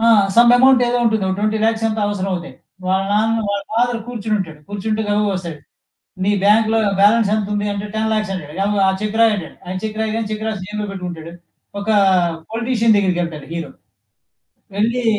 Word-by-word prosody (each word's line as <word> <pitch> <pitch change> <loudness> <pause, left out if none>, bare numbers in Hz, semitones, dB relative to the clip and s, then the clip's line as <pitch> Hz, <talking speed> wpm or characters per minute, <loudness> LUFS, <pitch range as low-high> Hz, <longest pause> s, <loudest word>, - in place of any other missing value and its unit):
ఆ! - - +1 0.3
Some 235 +1 +7
amount 260 0 +5
ఏదో 245 0 +1
ఉంటుంది. 220 -3 +1
ఓ - - 0
ట్వెంటీ 215 +1 0
లక్సో 225 0 +1
ఎంతో 220 0 -2
అవసరం 195 -1 -2
అవుతాయి. 180 0 -6 0.3
వాళ్ళ 190 +1 +1
నాన్న 225 +2 +2
వాళ్ళ 200 0 -1
ఫాదర్ 240 +1 +1
కూర్చొనుంటాడు. 210 -9 -3
కూర్చుంటే 215 +2 -2
గబగబా 205 0 +1
వస్తాడు. 170 -4 -5 0.7
నీ 200 - +2
బ్యాంక్‌లో 220 +2 +4 0.2
బ్యాలన్స్ 210 +1 +4
ఎంత 210 -2 -2
ఉంది 205 0 -1
అంటే, 200 +1 -4
10,00,000 215 -2 0
అంటాడు. 150 -5 -7
యవ్ 205 +1 0
ఆ - - +4
చెక్ 215 +1 -2
రాయి 225 -1 +5
అంటాడు. 175 -6 -8
ఆయన 185 +1 -4
చెక్ 215 0 -4
రాయిగానే 220 0 -2
చెక్ 215 +1 -4
రాసి 215 -4 -3
జేబులో 210 0 -4
పెట్టుకుంటాడు. 175 -4 -7 0.5
ఒక 200 - -7 0.6
పొలిటీషియన్ 230 -1 +2
దగ్గరికెళ్తాడు 175 -6 -1
హీరో. 170 -1 -4 1.1
వెళ్లి 235 +4 0
210 Hz, 175 wpm, -19 LUFS, 195-225 Hz, 1.1 s, Some